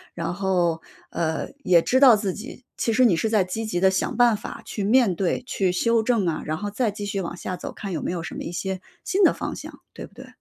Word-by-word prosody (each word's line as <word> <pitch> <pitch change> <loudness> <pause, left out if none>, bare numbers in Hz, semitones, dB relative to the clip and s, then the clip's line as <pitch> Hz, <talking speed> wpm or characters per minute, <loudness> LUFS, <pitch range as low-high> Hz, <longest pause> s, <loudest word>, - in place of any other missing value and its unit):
然 170 0 -3
后 175 -3 0 0.3
呃， 160 -1 -2 0.2
也 175 -2 +5
知 255 +9 +2
道 260 -4 +8
自 200 -3 -2
己 240 +4 -10
其 230 - 0
实 255 +3 +4
你 205 -8 +4
是 220 +7 0
在 215 -3 +3
积 200 +5 -4
极 215 -5 -2
的 190 +1 +5
想 190 - -1
办 240 -2 +5
法 - - -8
去 205 - -4
面 220 -2 +3
对， 190 +6 -1
去 190 -2 0
修 230 +5 +2
正 225 -4 +1
啊， 165 - -1
然 155 +1 -2
后 205 +4 -4
再 225 +2 0
继 205 0 -6
续 200 -1 -2
往 170 -1 -5
下 185 - -4
走， - - -6
看 200 - -6
有 160 - -3
没 - - -2
有 175 -2 -3
什 - - -6
么 - - -5
一 - - -5
些 190 +1 -4 0.2
新 390 +2 +1
的 - - +6
方 - - -5
向， - - -10
对 - - -8
不 - - -19
对？ - - -12
195 Hz, 280 characters per minute, -24 LUFS, 175-225 Hz, 0.3 s, 道